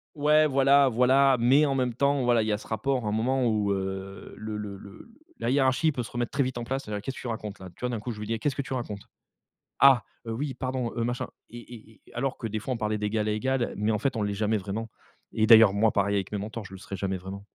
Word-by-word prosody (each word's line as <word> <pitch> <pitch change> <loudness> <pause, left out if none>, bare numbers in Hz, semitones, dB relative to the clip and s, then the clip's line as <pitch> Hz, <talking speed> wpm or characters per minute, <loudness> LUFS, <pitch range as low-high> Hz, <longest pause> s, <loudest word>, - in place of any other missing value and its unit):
Ouais, 150 +1 +4
voilà, 140 0 +4
voilà. 130 +2 +4
Mais 135 +6 +5
en 140 - 0
même 125 -2 0
temps, 140 0 +2
voilà, 120 -2 +3
il - - -3
y - - +1
a 105 - +1
ce - - -13
rapport, 125 +2 -1
à - - -1
un - - -1
moment, 125 +3 +1
où, 105 -2 +1
heu, 95 0 -5
le 110 -1 -5
le 105 -2 -6
le 100 - -13 0.3
la 115 - -1
hiérarchie 135 +4 +3
peut 125 -4 -3
se - - -10
remettre 120 0 -2
très 140 0 +1
vite 130 -1 -3
en - - -4
place, 135 +3 -3
voilà: 105 -1 -4
«Qu'est-ce 135 +3 -5
que - - -9
tu - - -6
racontes 105 -3 -5
là?» 95 -1 -9
Tu - - -25
vois, 125 - -1
d'un 120 -3 -3
coup, 120 +3 -5
je 105 - -8
lui 105 - -6
dis: 115 - -1
«Eh! 115 - -3
Qu'est-ce 145 +3 -1
que 140 - -1
tu 135 - -6
racontes»? 105 -5 -4 0.8
«Ah, 135 -3 +6 0.2
heu, 115 - -3
oui 135 +3 -3
pardon, 130 -2 -3
heu, 115 - 0
machin.» 120 +1 -2 0.2
Et 120 - -9
et 115 -2 -13
et - - -18
alors 135 +2 -2
que, 115 - -4
des 110 0 -3
fois, 130 +4 -4
on 120 - -3
parlait 110 -1 -1
d'égal 105 +1 -1
à - - +1
égal, 125 +3 -1
mais, 105 +2 0
en 105 - 0
fait, 135 +3 -1
on 110 - -1
l'est 105 - -1
jamais 105 +2 0
vraiment. 105 +3 -4 0.4
Et 110 - +2
d'ailleurs, 110 -3 +8
moi, 105 +2 +3
pareil 100 0 +1
avec 100 0 -2
mes 105 - -1
mentors, 110 +2 -6
je 95 - -12
le 95 - -8
serais 95 +1 -7
jamais 95 0 -2
vraiment. 95 +2 -9
115 Hz, 290 wpm, -27 LUFS, 105-130 Hz, 0.8 s, d'ailleurs